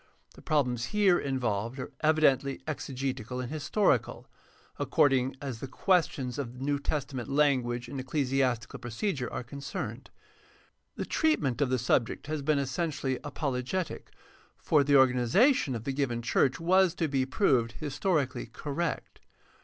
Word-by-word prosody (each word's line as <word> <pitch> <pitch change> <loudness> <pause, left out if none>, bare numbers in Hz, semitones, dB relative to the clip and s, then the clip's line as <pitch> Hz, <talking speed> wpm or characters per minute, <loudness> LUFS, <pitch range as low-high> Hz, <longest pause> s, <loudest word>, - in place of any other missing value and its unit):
The - - -15
prob 145 -4 +2
lems 120 -1 -2
here 200 -1 +3
involved 120 -3 -2
are 130 - -6
evidently 140 -4 +3
exegetical 130 -4 -4
and 125 0 -4
historical, 155 +7 0 0.5
according 135 -5 +2
as 135 -5 -5
the 135 - -5
questions 135 -4 0
of 125 -2 -5
New 140 +1 0
Testament 140 -4 -3
language 130 -4 +1
and 135 +2 -6
ecclesiastical 130 -3 -1
procedure 125 - -3
are - - -4
concerned. 135 - -6 0.9
The - - -3
treatment 150 - +1
of 140 - +2
the 130 - +2
subject 120 -1 0
has 155 0 -3
been 150 +1 +2
essentially 135 -1 -2
apologetic, 145 +4 -3 0.5
for 145 -2 +3
the 145 +1 +1
organi 125 -3 +4
zation 215 - +4
of 115 - -5
the 135 - -2
given 125 -4 -1
church 130 +4 +2
was 185 +1 +3
to 165 - 0
be 135 -2 0
proved 130 - +2
historically 145 -4 -1
correct. 150 +7 -4
135 Hz, 140 wpm, -29 LUFS, 125-155 Hz, 0.9 s, organi